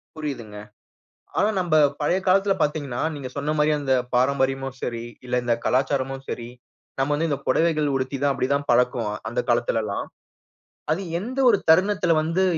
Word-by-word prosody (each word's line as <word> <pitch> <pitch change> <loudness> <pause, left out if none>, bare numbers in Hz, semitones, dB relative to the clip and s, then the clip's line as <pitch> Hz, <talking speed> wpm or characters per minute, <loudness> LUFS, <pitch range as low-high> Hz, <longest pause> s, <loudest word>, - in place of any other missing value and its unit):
புரியிதுங்க. 130 -9 -6 0.8
ஆனா 210 - +3
நம்ப 170 -3 0 0.3
பழைய 160 +5 +2
காலத்தில 195 +2 +4
பார்த்தீங்கன்னா, 145 -4 -1
நீங்க 140 -3 -6
சொன்ன 145 +2 -1
மாரி 150 +1 +3
அந்த 135 -2 +1 0.2
பாரம்பரியமும் 135 +1 +1
சரி, 115 -1 -3 0.2
இல்ல 125 - -3
இந்த 120 -1 +2
கலாச்சாரமும் 135 0 0
சரி. 120 -1 -5 0.5
நம்ம 140 +2 +1
வந்து 165 +3 0
இந்த 140 - 0
பொடவைகள் 155 +1 +2
உடுத்தி 130 +1 -2
தான் 140 -1 +3
அப்டி 130 - 0
தான் 140 0 -1
பழக்குவோம் 120 -3 +2
அந்த 120 - -1
காலத்திலலாம். 115 -3 0 0.9
அது 165 +5 0 0.2
எந்த 250 +8 -5
ஒரு 205 - +5
தருணத்தில 185 +1 +4
வந்து 165 +4 0
140 Hz, 155 wpm, -24 LUFS, 125-160 Hz, 0.9 s, ஒரு